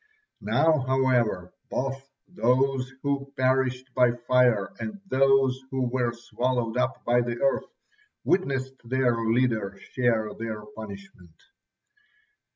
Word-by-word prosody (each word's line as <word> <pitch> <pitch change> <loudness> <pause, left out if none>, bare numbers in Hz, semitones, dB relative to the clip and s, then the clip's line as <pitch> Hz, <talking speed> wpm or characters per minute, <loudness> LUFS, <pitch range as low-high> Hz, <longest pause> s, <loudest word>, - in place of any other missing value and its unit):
Now, 160 -1 +3
however, 125 -8 +1 0.2
both 135 +1 -3 0.2
those 130 -4 +1
who 140 -1 -1
perished 130 0 +1
by 125 -1 +4
fire 120 -4 +2
and 210 -2 -5
those 135 -3 +3
who 130 -1 -1
were 125 -2 +1
swallowed 120 0 -2
up 125 - -1
by 120 +1 +3
the 120 0 -3
earth 185 - 0 0.5
witnessed 135 -7 0
their 125 0 +1
leader 110 -4 +1
share 115 -4 +1
their 110 -2 -5
punishment. 100 -5 -11
125 Hz, 110 wpm, -26 LUFS, 115-135 Hz, 0.5 s, by